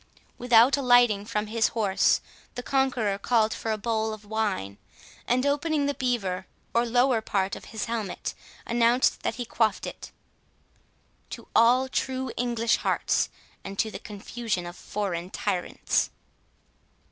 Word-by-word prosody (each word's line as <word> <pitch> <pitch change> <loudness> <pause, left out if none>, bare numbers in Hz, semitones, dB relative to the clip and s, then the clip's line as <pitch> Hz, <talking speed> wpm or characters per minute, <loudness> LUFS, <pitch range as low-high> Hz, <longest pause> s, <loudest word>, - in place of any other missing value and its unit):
Without 245 +2 +5
alighting 245 -6 +4
from 210 -1 -2
his 220 +1 +1
horse, 200 -4 +3 0.3
the 245 - -5
conqueror 250 -8 0
called 220 0 +2
for 225 - -3
a 215 - 0
bowl 220 0 -1
of 215 -1 -10
wine, 205 - -2 0.5
and 255 +2 +2
opening 290 +1 +1
the 285 - 0
beaver, 200 -9 -2 0.3
or 235 +1 +2
lower 245 0 +3
part 195 -3 -1
of - - -10
his 220 -2 -4
helmet, 225 -5 -3 0.3
announced 235 +2 +2
that - - -2
he 245 - -4
quaffed 220 -3 0
it, - - -8 1.2
"To - - -9
all 250 +3 +5
true 260 -1 -2
English 235 -1 +1
hearts, - - 0 0.3
and 195 0 -7
to 220 - 0
the - - -7
confusion 205 -2 -4
of 175 0 -7
foreign 185 -4 -4
tyrants." 180 -1 -1
225 Hz, 140 wpm, -26 LUFS, 205-245 Hz, 1.2 s, Without